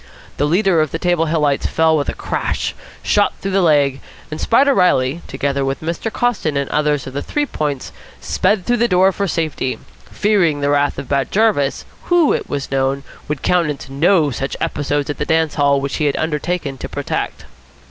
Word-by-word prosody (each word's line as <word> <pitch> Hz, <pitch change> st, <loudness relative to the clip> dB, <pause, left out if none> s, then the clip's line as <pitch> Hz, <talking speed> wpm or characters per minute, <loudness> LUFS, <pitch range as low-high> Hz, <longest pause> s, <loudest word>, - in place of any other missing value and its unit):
The 145 Hz, -, +1 dB
leader 180 Hz, 0 st, +3 dB
of 155 Hz, -, 0 dB
the 165 Hz, -, -3 dB
Table 175 Hz, -1 st, +1 dB
Hillites 150 Hz, -3 st, +1 dB
fell 160 Hz, 0 st, +2 dB
with 145 Hz, -2 st, 0 dB
a -, -, -4 dB
crash, -, -, -2 dB, 0.3 s
shot -, -, +2 dB
through 195 Hz, -, -4 dB
the 195 Hz, 0 st, +2 dB
leg; 145 Hz, -5 st, +3 dB, 0.3 s
and 155 Hz, -, -5 dB
Spider 275 Hz, +4 st, +4 dB
Reilly, 160 Hz, -, +2 dB
together 140 Hz, -1 st, -1 dB
with 135 Hz, 0 st, -2 dB
Mr. 170 Hz, +7 st, -3 dB
Coston 210 Hz, -13 st, 0 dB
and 140 Hz, -1 st, -1 dB
others 150 Hz, -2 st, +1 dB
of 130 Hz, -, -8 dB
the 140 Hz, -, -3 dB
Three 295 Hz, 0 st, -1 dB
Points, 145 Hz, -, -3 dB, 0.3 s
sped 205 Hz, -3 st, 0 dB
through 245 Hz, 0 st, +2 dB
the 235 Hz, +1 st, +2 dB
doorway 190 Hz, -1 st, +4 dB
for 200 Hz, +1 st, -2 dB
safety, 155 Hz, -6 st, -2 dB, 0.3 s
fearing 190 Hz, -8 st, +2 dB
the 140 Hz, 0 st, +1 dB
wrath 145 Hz, 0 st, +1 dB
of 135 Hz, -1 st, -6 dB
Bat 140 Hz, 0 st, 0 dB
Jarvis, 200 Hz, -11 st, +1 dB, 0.2 s
who, 345 Hz, -4 st, +3 dB
it -, -, -3 dB
was 140 Hz, -1 st, -4 dB
known, 135 Hz, 0 st, 0 dB, 0.2 s
would 150 Hz, -2 st, -4 dB
countenance 150 Hz, -6 st, 0 dB
no 155 Hz, +1 st, +3 dB
such 135 Hz, +2 st, -4 dB
episodes 145 Hz, 0 st, -1 dB
at -, -, -8 dB
the -, -, 0 dB
dance 160 Hz, -1 st, +1 dB
hall 140 Hz, -1 st, +3 dB
which 135 Hz, 0 st, -3 dB
he 155 Hz, -, 0 dB
had 145 Hz, -, +1 dB
undertaken 155 Hz, -2 st, -2 dB
to -, -, -6 dB
protect. -, -, -4 dB
150 Hz, 195 wpm, -18 LUFS, 140-180 Hz, 0.3 s, Spider